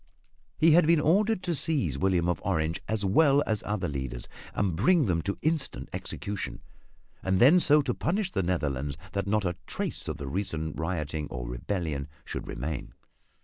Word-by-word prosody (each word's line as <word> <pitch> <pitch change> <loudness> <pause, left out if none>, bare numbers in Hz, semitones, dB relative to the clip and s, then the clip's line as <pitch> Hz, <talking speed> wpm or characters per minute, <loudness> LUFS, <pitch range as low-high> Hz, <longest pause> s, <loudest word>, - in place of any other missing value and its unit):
He 165 +1 +5
had 160 0 +6
been 165 -1 +5
ordered 195 +7 +2
to 175 - 0
seize 140 - +1
William 90 +2 +1
of 85 -4 0
Orange 80 -4 0
as 110 -2 0
well 140 +8 +4
as 110 -2 0
other 105 -3 -1
leaders 65 -4 -4 0.3
and 95 -5 0
bring 145 - +4
them 85 -5 +1
to 100 +4 -3
instant 155 -1 -1
execution, 100 -1 -5 0.6
and 95 0 +1
then 150 +9 +7
so 150 -3 +5
to - - 0
punish 185 +3 -1
the - - 0
Netherlands 75 -6 -1
that 100 0 -2
not 105 0 +1
a 90 -1 -1
trace - - -4
of - - -3
the 70 - -6
recent 80 -2 -3
rioting 80 -3 -2
or - - -6
rebellion 70 +3 -3 0.2
should - - -5
remain. 70 +4 -5
95 Hz, 175 wpm, -28 LUFS, -, 0.6 s, then